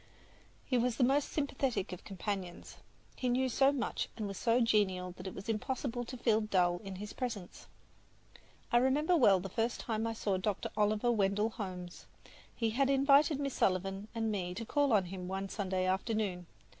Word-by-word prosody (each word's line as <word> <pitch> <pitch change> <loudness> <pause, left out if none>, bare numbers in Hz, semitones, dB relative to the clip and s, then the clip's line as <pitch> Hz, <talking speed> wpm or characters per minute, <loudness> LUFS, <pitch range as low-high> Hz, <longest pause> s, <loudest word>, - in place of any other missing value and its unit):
He 250 -3 +1
was 240 -1 +1
the 255 - +2
most 275 +3 +2
sympathetic 270 -8 -1
of 180 - -8
companions. 190 -2 -5 0.4
He 250 - -1
knew 255 +2 +2
so 270 +2 +4
much 275 -3 -2
and 215 -3 -3
was 195 - -5
so 235 +1 +3
genial 195 -6 +2
that 180 +1 -9
it 190 - -6
was 195 - -8
impossible 245 +2 -2
to 255 +2 -7
feel 225 -2 +2
dull 180 -4 +2
in 195 -1 -6
his 210 +3 -7
presence. 220 -8 -5 1.0
I 240 - +5
remember 285 +7 +3
well 205 - +5
the 190 - -5
first 225 +5 -1
time 225 -1 -2
I 225 - -2
saw 205 -3 -1
Dr. 195 +1 -2
Oliver 215 +3 +2
Wendell 210 0 +1
Holmes. 180 -5 -7 0.5
He 225 -2 0
had 270 +4 +2
invited 275 +2 +4
Miss 275 -2 -2
Sullivan 195 +2 0
and 225 -1 0
me 180 -3 -3
to 230 +4 -5
call 285 +4 +2
on 205 -4 +4
him 180 0 -6
one 195 +1 -3
Sunday 190 -3 -1
afternoon. 190 -2 -1
215 Hz, 180 wpm, -33 LUFS, 190-250 Hz, 1.0 s, I